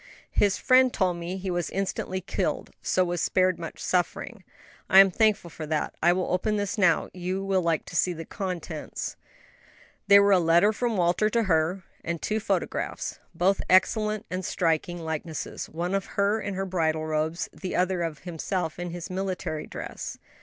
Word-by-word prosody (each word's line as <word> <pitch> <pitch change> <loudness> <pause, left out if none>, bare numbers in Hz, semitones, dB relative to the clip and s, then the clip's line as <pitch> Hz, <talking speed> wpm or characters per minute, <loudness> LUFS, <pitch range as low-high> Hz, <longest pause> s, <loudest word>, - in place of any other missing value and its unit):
"His 200 -2 +2
friend 255 0 +5
told 185 -5 0
me 170 +2 -4
he 190 0 -3
was 175 -2 -1
instantly 190 -1 -2
killed, 185 - -2
so 185 - +2
was 175 0 -2
spared 185 -1 +2
much 165 -1 -7
suffering." 185 +4 -1 0.5
"I 190 - +6
am 195 -1 +9
thankful 210 -4 +2
for 155 -1 -7
that. 155 0 -1
I 175 - +5
will 180 0 0
open 210 +4 +1
this 205 0 -1
now; 180 -7 +3
you 185 +2 -3
will 190 -1 +2
like 165 -2 0
to - - -9
see 180 - +3
the 165 -1 -6
contents." 175 -5 -5 0.9
They 200 0 +9
were 200 0 +4
a 190 - +6
letter 170 +5 +4
from 235 -1 -1
Walter 180 +4 +2
to 230 +1 +1
her, 175 0 +1 0.2
and 170 0 -3
two 215 +7 -1
photographs 220 - -2 0.2
both 190 +4 +2
excellent 210 +3 +3
and 185 +1 -2
striking 170 0 0
likenesses; 160 -1 -5
one 175 +4 -3
of 195 0 0
her 200 +2 +2
in 200 -2 -4
her 195 +1 -2
bridal 160 -4 0
robes, 155 +3 -1
the 185 - -5
other 185 0 +1
of 165 -3 -4
himself 175 -1 -3
in 175 0 -3
his 175 +2 -6
military 185 -4 -3
dress. - - -6
185 Hz, 180 wpm, -27 LUFS, 170-195 Hz, 0.9 s, am